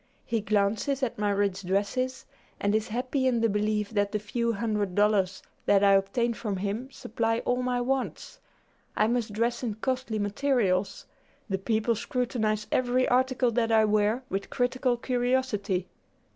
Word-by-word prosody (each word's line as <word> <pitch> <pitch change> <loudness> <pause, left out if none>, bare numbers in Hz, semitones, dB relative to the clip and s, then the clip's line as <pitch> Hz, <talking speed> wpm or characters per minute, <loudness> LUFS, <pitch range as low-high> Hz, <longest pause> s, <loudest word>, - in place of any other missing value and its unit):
He 230 -2 -1
glances 215 +7 0
at 235 -4 -2
my 210 -1 +1
rich 200 -1 0
dresses, 205 +8 -1 0.3
and 200 0 +1
is 220 +1 +1
happy 255 +4 -1
in 245 -2 +2
the 230 - +3
belief 210 0 0
that 205 -2 0
the 215 - 0
few 230 +3 -1
hundred 210 -3 -1
dollars 205 -2 +2 0.2
that 200 0 +5
I 200 - +6
obtain 195 +5 +2
from 210 -3 -3
him 205 +7 -3
supply 225 -3 -2
all 250 0 +1
my 250 -1 0
wants. 265 +1 -3 0.6
I 215 - +4
must 235 -1 0
dress 235 +3 -1
in 230 -5 -2
costly 255 -1 -2
materials. 205 -3 0 0.5
The 190 - 0
people 220 +3 +1
scrutinize 220 -2 -1
every 255 0 +2
article 255 -1 +2
that 230 0 +1
I 220 -1 +5
wear 215 +4 +1
with 195 -4 -3
critical 245 0 0
curiosity. 245 -7 0
220 Hz, 160 wpm, -27 LUFS, 205-245 Hz, 0.6 s, I